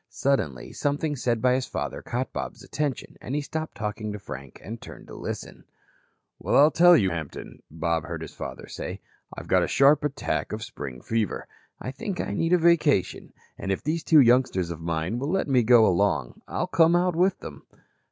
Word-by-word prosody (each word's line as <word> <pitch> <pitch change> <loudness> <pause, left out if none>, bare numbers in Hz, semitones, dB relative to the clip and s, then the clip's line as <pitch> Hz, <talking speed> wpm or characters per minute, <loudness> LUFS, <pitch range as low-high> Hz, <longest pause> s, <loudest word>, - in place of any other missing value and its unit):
Suddenly, 80 - -1
something 145 +1 -1
said 120 -3 -1
by 125 -1 +4
his 130 0 -1
father - - -4
caught 125 +2 -3
Bob's - - -5
attention, 145 -3 -3
and 135 - -4
he 150 - 0
stopped 155 +2 -5
talking 105 0 -4
to 105 - -5
Frank 70 -9 -9
and 115 +3 -7
turned - - -11
to - - -10
listen. - - -7 0.8
"Well, - - -1
I'll 150 +3 +7
tell 175 0 +7
you, 95 -3 +2
Hampton," 80 -3 -7
Bob 80 +1 -1
heard 80 -1 -5
his 80 - -9
father - - -7
say, - - -6 0.4
"I've - - -8
got - - +4
a - - +1
sharp 140 +2 +4
attack 145 -5 -2
of 110 +1 -4
spring 65 - -8
fever. 110 -4 -2 0.3
I 130 - -5
think 200 - -5
I - - -2
need 165 +1 0
a - - +7
vacation. 165 - +2 0.3
And 95 - -3
if 95 - -2
these 160 +2 -1
two 160 -2 +6
youngsters 120 -8 +3
of 85 -1 -7
mine 85 +7 -2
will 140 +3 -2
let 190 -1 0
me 130 -3 +4
go 115 -1 +6
along, 85 - +1
I'll - - -2
come 165 +1 +4
out 180 -1 +2
with 185 +3 +2
them." - - -10
125 Hz, 200 wpm, -26 LUFS, 95-150 Hz, 0.8 s, I'll